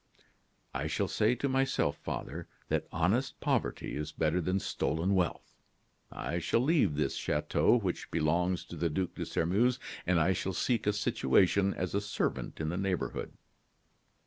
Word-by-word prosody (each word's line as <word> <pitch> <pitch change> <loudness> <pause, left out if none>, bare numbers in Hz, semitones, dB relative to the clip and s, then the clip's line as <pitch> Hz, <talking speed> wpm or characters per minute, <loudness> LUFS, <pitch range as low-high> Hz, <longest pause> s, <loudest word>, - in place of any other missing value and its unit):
"I - - -2
shall - - 0
say - - +2
to 140 - -1
myself, 135 0 +1
father, - - -5 0.2
that - - 0
honest 95 +11 +1
poverty - - -1
is 75 +1 -3
better 80 +3 +1
than 90 +3 0
stolen 90 +1 0
wealth. 90 -3 -1 0.6
I 85 +6 -3
shall 115 +7 +1
leave 135 - +3
this 70 -2 0
chateau, 75 +10 +2
which 95 -6 -3
belongs 85 +3 +1
to - - -9
the 85 +1 0
Duc 90 +3 -2
de - - -5
Sairmeuse, 105 +10 +2 0.3
and 90 -2 +4
I 85 +4 +3
shall 95 +2 -2
seek 115 +4 0
a 105 - +4
situation 100 0 +2
as 90 -1 -3
a 100 - +1
servant 105 0 -2
in 80 0 -1
the 90 - -2
neighborhood." 95 -2 -2
90 Hz, 160 wpm, -31 LUFS, 80-105 Hz, 0.6 s, and